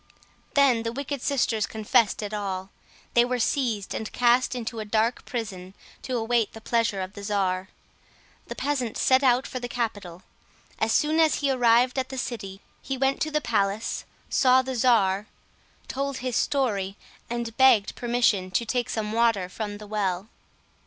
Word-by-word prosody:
Then 270 -5 +4
the 230 0 -3
wicked 280 +1 -4
sisters 230 -6 0
confessed 215 -1 +1
it 210 +1 -5
all. 195 -2 -4 0.4
They 235 - +6
were 250 +1 -1
seized 230 -4 -1
and 220 - -4
cast 245 +2 +3
into 235 -1 -4
a - - -3
dark 220 +3 0
prison, 195 -6 -6 0.3
to 255 -2 -2
await 230 -1 0
the 225 - -9
pleasure 220 -3 0
of 185 +1 -6
the 205 - -9
czar. 190 -2 -1 0.8
The - - -6
peasant 260 -6 -2
set 260 0 +4
out 255 0 +3
for 255 - -5
the 245 - -4
capital. 205 -7 -4 0.6
As 220 - +1
soon 305 +6 +2
as 320 -1 +4
he 280 -2 0
arrived 250 +1 +3
at 260 - -3
the 265 - -6
city, 200 -6 -5 0.2
he 270 - -4
went 270 +1 +1
to 310 - +1
the 300 0 0
palace, 210 -3 -1 0.2
saw 260 -1 +4
the 260 0 -4
czar, 210 -5 +3 0.6
told 275 0 -3
his 255 -2 -3
story, 205 -8 0 0.3
and 235 -1 -4
begged 260 -6 +5
permission 235 -6 +1
to 185 +6 0
take 245 +1 -1
some 215 -1 -2
water 225 -5 +2
from 205 +1 -5
the 210 - -10
well. 200 -1 -2
230 Hz, 170 wpm, -26 LUFS, 205-255 Hz, 0.8 s, They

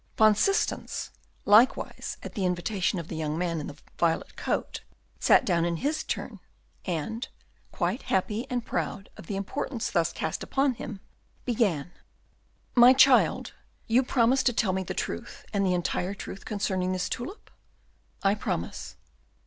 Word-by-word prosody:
Van 215 -1 +7
Systens, 390 - 0 0.3
likewise 220 +6 +3
at - - -7
the 200 - -2
invitation 185 +2 0
of 170 -2 -5
the 170 - -6
young 155 -1 -2
man 170 -2 -1
in 150 - -5
the 145 - -9 0.2
violet 165 -1 +1
coat, - - -2 0.4
sat - - +5
down 170 -3 +2
in 170 0 0
his 305 - -1
turn, - - -4 0.5
and, 215 - -3 0.4
quite 185 +6 -1
happy 210 +6 -1
and 245 -2 -2
proud 195 - -3
of - - -12
the 200 - -3
importance 220 +5 -3
thus 170 -1 +2
cast 160 - -3
upon 270 -1 +1
him, 210 -4 -7 0.4
began, 200 - 0 0.8
"My 245 +1 +8
child, 265 -1 +5 0.3
you 235 +3 +4
promise 255 0 +3
to 245 - +2
tell 215 -4 +1
me 190 - 0
the 185 - -5
truth 85 - -5
and 200 -1 +2
the 185 -2 +2
entire 180 +2 -1
truth 195 - -8
concerning 190 -3 -1
this 185 -1 -1
tulip?" 355 - -6 0.7
"I 195 0 +4
promise." 85 - -4
195 Hz, 155 wpm, -28 LUFS, 175-240 Hz, 0.8 s, My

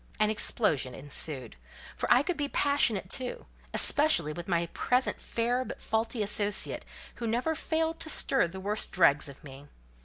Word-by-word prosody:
An 215 0 +3
explosion 160 - +1
ensued: 135 - -5 0.4
for - - -2
I 250 +3 +6
could 360 +3 -1
be 290 -2 -2
passionate, 280 -11 +1
too; 250 +5 -4 0.3
especially 285 - +3
with 175 +3 -7
my 170 -2 +1
present 250 +1 +1
fair 240 +2 -1
but - - -8
faulty 225 0 -1
associate, 205 0 -1 0.3
who 235 - -3
never 245 +8 0
failed 320 +1 -1
to 320 - -4
stir 270 - +3
the 190 +3 -8
worst 205 +3 -1
dregs 150 -5 +3
of 140 +3 -13
me. 140 0 -11
215 Hz, 160 wpm, -29 LUFS, 165-260 Hz, 0.4 s, I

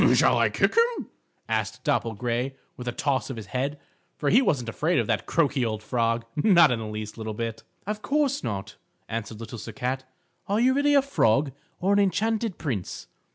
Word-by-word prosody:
"Shall - - +4
I - - +4
kick - - +2
him?" 465 +1 +2 0.4
asked - - -2
Dapple 115 -1 0
Gray 120 +4 -2 0.2
with 125 - -8
a - - +1
toss 135 +3 -1
of 130 - -4
his 110 - -6
head, 140 +3 -1 0.4
for 145 - 0
he 240 - +6
wasn't 135 - +1
afraid 155 +10 0
of - - +2
that - - -1
croaky 145 -5 +2
old 110 -2 -2
frog, 115 0 0
not 170 -1 +6
the 125 - +1
least 105 +1 -6
little 110 -1 -4
bit. 115 0 -4 0.2
"Of 210 +1 -3
course 280 +4 +1
not," 100 -3 -4 0.3
answered 110 -1 -5
Little 115 0 -7
Sir 110 +1 -7
Cat. 130 +4 -2 0.4
"Are 205 +2 +1
you 255 +2 +4
really 285 +1 +3
a 280 - +5
frog, 140 - +2 0.3
or 195 +3 +2
an 200 - +4
enchanted 215 +2 +1
prince?" 115 - -4
135 Hz, 195 wpm, -26 LUFS, -, 0.4 s, he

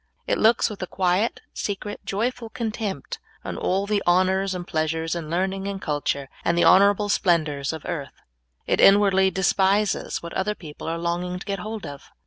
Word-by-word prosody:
It - - 0
looks 225 +2 +4
with 210 - -7
a 185 - -3
quiet, 185 +5 0
secret, 205 0 -4
joyful 230 +3 -2
contempt 215 - -4 0.3
on - - -4
all 195 +2 0
the 205 -1 0
honors 185 +2 +2
and 175 -1 -5
pleasures, 160 +1 -1
and 165 -3 -5
learning 190 +3 -1
and 200 -1 -4
culture, 145 -3 -2 0.2
and 170 - +1
the 175 - +4
hon 190 - +8
orable 205 +1 +3
splendors 155 -8 +1
of 160 -2 -7
earth. 150 -6 -5 0.5
It - - +1
inwardly 195 -1 +6
despises 195 +2 +1
what 170 - -7
other 210 +2 -1
people 155 -5 -9
are 165 +1 -1
longing 175 +1 -2
to 180 - -9
get 200 -1 -3
hold 215 +2 -6
of. 140 -1 -9
190 Hz, 180 wpm, -24 LUFS, 170-200 Hz, 0.5 s, hon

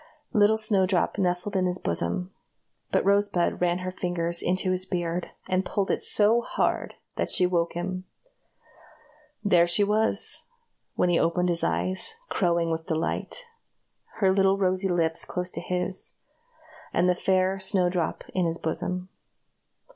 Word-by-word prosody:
Little 210 -1 +4
Snowdrop 195 -3 +1
nestled 180 +2 +1
in 185 -1 +2
his 180 0 -1
bosom, 85 - -2 0.6
but - - +1
Rosebud 200 -4 +1
ran 175 0 +2
her 185 - -2
fingers 170 -2 -2
into 185 +1 0
his 185 0 0
beard, 175 -1 -2 0.2
and 185 0 +1
pulled 195 0 -1
it - - -1
so 220 +3 +4
hard - - -1 0.2
that - - -1
she 180 - +4
woke 170 -2 0
him. 185 +2 -4 1.4
There 175 -4 +4
she 175 +4 +3
was, 215 +2 +2 0.5
when 180 - +2
he 175 - +3
opened 180 +2 +1
his 170 -1 0
eyes, 185 - -1
crowing 170 -3 +1
with 160 0 -3
delight 165 - -3 0.7
her 195 -3 +3
little 195 0 +3
rosy 185 0 +1
lips 165 -2 +1
close 180 0 -3
to - - -5
his, 180 +1 -2 0.8
and 175 - +2
the 180 - +4
fair 185 +1 +1
Snowdrop 180 -3 0
in 180 -2 +1
his 165 0 -2
bosom. 180 +3 -3
180 Hz, 145 wpm, -26 LUFS, 175-190 Hz, 1.4 s, Little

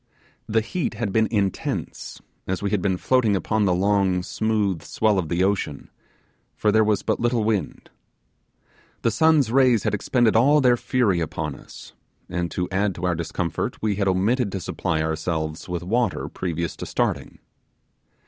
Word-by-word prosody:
The 110 +1 +2
heat 135 +2 -3
had 105 -3 -3
been 110 0 +3
intense, 100 -4 -3 0.3
as 95 +1 -2
we 100 - -1
had 105 -3 +1
been 95 -1 0
floating 115 -1 +2
upon 105 +2 0
the 90 - +3
long 95 -1 +2
smooth 105 -5 -1
swell 110 -3 +1
of 80 -4 -3
the 85 +2 +1
ocean, 95 -7 -2 0.6
for 105 - +2
there 110 +1 +4
was 105 -2 +1
but - - 0
little 120 -1 +1
wind. 105 -2 -2 1.1
The 115 - +3
sun's 150 0 +3
rays 125 -4 +4
had 105 - 0
expended 115 +2 +2
all 140 +7 +5
their 125 -3 +4
fury 120 -7 +1
upon 80 - -3
us; - - -13 0.4
and 85 0 -2
to 90 +2 -2
add 100 0 0
to 90 - -4
our 90 - +2
discomfort, 85 0 -3
we 105 -3 -1
had 100 -1 0
omitted 100 +5 +1
to 95 - -2
supply 80 -2 -2
ourselves 80 0 -3
with 90 -1 -3
water 115 +2 0
previous 85 -2 -3
to - - -6
starting. - - -2
100 Hz, 165 wpm, -23 LUFS, 90-110 Hz, 1.1 s, all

